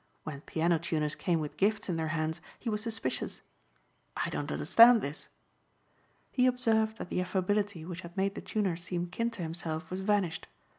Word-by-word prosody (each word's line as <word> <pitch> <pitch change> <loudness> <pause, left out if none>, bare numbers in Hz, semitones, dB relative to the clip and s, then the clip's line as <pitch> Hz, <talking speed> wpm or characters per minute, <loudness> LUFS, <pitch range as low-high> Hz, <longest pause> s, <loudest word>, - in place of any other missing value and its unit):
When 140 -3 -6
piano 165 +2 +1
tuners 155 -3 -1
came 175 -4 0
with 150 -1 -5
gifts 210 +1 +1
in 180 - 0
their 160 -1 -1
hands 155 0 -1 0.2
he 235 - -3
was 210 0 -1
suspicious. 225 0 -3 0.8
"I - - -1
don't - - -3
understand 230 -1 +7
this." 145 +2 -5 1.0
He 255 -1 +4
observed 225 -3 +2
that - - -6
the - - 0
affability 190 -1 0
which 180 +1 -6
had 170 +2 -11
made 195 +1 +1
the - - -6
tuner 200 -5 0
seem 175 +1 -3
kin 230 +7 -1
to 220 -6 -6
himself 160 -1 -4
was 185 - -2
vanished. 190 -4 0
180 Hz, 180 wpm, -31 LUFS, 165-215 Hz, 1.0 s, understand